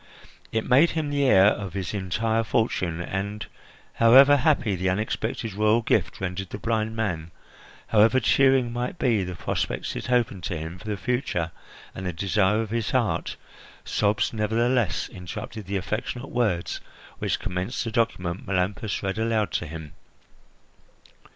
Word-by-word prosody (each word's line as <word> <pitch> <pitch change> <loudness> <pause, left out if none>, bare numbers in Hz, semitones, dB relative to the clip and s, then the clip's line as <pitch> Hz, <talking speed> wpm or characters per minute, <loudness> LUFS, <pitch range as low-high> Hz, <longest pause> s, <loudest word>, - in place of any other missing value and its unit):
It 110 0 -1
made 140 +7 +6
him 150 -2 -1
the 140 -1 +1
heir 95 -7 +6
of 100 -4 -5
his 95 0 -3
entire 110 +4 0
fortune 95 -7 0
and, 100 +4 -4 0.5
however 135 +5 +7
happy 140 - +2
the 95 +1 0
unexpected 110 +3 -2
royal 110 +3 +2
gift 100 -3 +1
rendered 95 0 -4
the - - -5
blind 110 0 -1
man, 90 -8 -2 0.6
however 115 +4 +4
cheering 130 -1 +3
might 125 +7 -3
be 115 -9 +2
the 90 0 -5
prospects - - -3
it - - -5
opened 115 -7 +1
to 85 - -2
him 80 +3 -6
for 90 - -14
the 105 -1 -2
future 100 - -1 0.4
and 95 - -5
the 90 - -2
desire 100 +4 +1
of 110 - -8
his 115 -3 -1
heart, - - 0 0.5
sobs 105 +2 +1
nevertheless 115 +1 +1
interrupted 95 +3 -7
the 100 +1 -1
affectionate 115 +6 -4
words 105 -8 -1 0.4
which - - -1
commenced 90 +6 -3
the 115 - -4
document 95 -6 -1
Melampus 100 +3 -1
read 95 +2 -2
aloud 110 -2 0
to 85 - -2
him. 80 -1 -8
105 Hz, 150 wpm, -25 LUFS, 95-115 Hz, 0.6 s, however